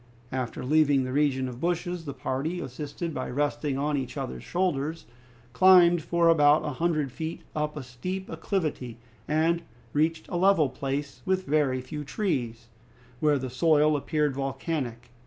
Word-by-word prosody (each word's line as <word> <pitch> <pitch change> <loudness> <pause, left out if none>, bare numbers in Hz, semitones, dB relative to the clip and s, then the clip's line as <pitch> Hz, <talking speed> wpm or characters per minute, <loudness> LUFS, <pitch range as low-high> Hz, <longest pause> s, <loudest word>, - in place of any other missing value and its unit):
After 125 -1 -3
leaving 145 -1 +4
the 130 - -4
region 135 -2 +1
of 125 -1 -7
bushes, 175 0 -1
the 140 - -4
party, 140 +6 -2
assisted 150 +3 -5
by 130 - -4
resting 145 0 -1
on 145 +1 0
each 130 -2 -4
other's 65 -1 -5
shoulders, 165 -3 -1 0.5
climbed 175 +2 +6
for 170 +2 +2
about 150 -2 +5
a - - -1
hundred 155 -1 0
feet 160 +5 -5
up 150 0 -2
a 145 - -5
steep 185 +10 -5
acclivity 155 - -3 0.3
and 165 +2 +2 0.3
reached 160 +2 +1
a 175 - -3
level 180 -6 +4
place, 140 +1 -4
with 190 0 0
very 140 -3 +1
few 150 +3 -6
trees, 125 - -2 0.5
where 150 -2 +3
the 130 -2 -4
soil 155 +2 +4
appeared 150 0 0
volcanic. 135 -3 -3
150 Hz, 155 wpm, -27 LUFS, 130-165 Hz, 0.5 s, climbed